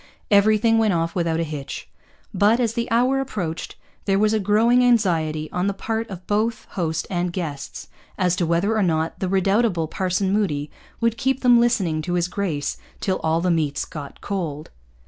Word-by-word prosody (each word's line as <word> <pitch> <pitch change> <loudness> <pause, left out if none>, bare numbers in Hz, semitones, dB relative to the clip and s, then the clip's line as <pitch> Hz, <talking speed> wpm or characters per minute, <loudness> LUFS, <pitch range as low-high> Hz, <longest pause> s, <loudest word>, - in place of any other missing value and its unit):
Everything 215 +2 +4
went 215 -3 +3
off 165 0 -1
without 165 -2 0
a - - +1
hitch. 150 -3 -6 0.5
But, 210 +5 +3
as 230 -3 +1
the 235 0 -2
hour 250 +4 +2
approached, 190 -12 -4 0.3
there 195 -1 +2
was 215 +1 +3
a 220 - +2
growing 225 +5 +3
anxiety, 165 -10 +2
on 180 +2 -1
the 200 - -1
part 225 +3 -3
of 185 -2 -8
both 215 +2 0
host 160 -3 -2
and 175 -1 -1
guests, 150 -7 -5 0.3
as 180 -2 +2
to 175 - 0
whether 175 +7 +1
or 215 - +2
not 160 -3 0
the 190 - -1
redoubtable 195 -2 +2
Parson 190 +3 -1
Moody 150 -9 0 0.3
would 230 0 +1
keep 265 +1 0
them 245 -2 +6
listening 190 -10 +1
to 175 +3 -3
his 175 0 +1
grace 175 -7 -2 0.2
till 190 -1 -1
all 160 +1 +1
the 180 0 +1
meats 155 -4 0
got 145 -3 -9
cold. 165 -7 -4
190 Hz, 185 wpm, -22 LUFS, 165-220 Hz, 0.5 s, them